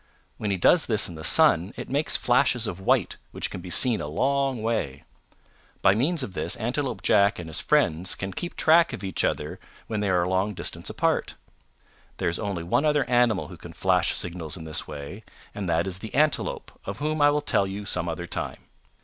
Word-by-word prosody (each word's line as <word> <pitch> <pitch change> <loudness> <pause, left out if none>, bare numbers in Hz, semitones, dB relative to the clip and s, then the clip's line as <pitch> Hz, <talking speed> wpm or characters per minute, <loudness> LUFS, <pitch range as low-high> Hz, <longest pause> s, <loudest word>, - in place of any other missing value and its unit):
When 105 - -3
he 100 - 0
does 160 - +4
this 110 -3 +2
in 85 - -8
the 80 -1 -9
sun 85 +3 +4
it - - -6
makes 145 +3 +2
flashes 120 -1 +2
of 95 -4 -4
white 95 - +1
which - - -4
can 90 - -6
be 90 - -9
seen 120 +5 +3
a - - -4
long 135 - 0
way. 85 - -2 0.8
By 95 - +6
means 145 - 0
of 100 - -6
this - - -2
Antelope 120 -1 -2
Jack 100 +2 +4
and 85 - -7
his 80 - -2
friends 85 +4 +1
can 100 -1 -5
keep 175 - -5
track 165 +1 +4
of 95 - -6
each 95 -3 -1
other - - -2 0.3
when 110 -2 -3
they 105 -1 0
are 90 -2 +2
a - - -1
long 95 +2 0
distance - - -4
apart. - - 0 0.8
There - - 0
is 85 - -3
only 100 -5 -3
one 85 - +1
other 150 -4 +2
animal 120 -5 +2
who - - -10
can - - -11
flash - - +1
signals 85 -3 -4
in 80 - -8
this 80 0 -3
way, 75 +8 -8 0.3
and 100 -3 -4
that 85 0 +1
is 95 -1 -4
the 110 +4 -8
Antelope 150 +1 +1
of 100 0 -5
whom 155 +3 -1
I 145 - +7
will 150 0 +1
tell 100 -8 +1
you 100 +2 -6
some 90 -3 -2
other 85 +1 -4
time. - - -4
100 Hz, 215 wpm, -25 LUFS, 90-125 Hz, 0.8 s, I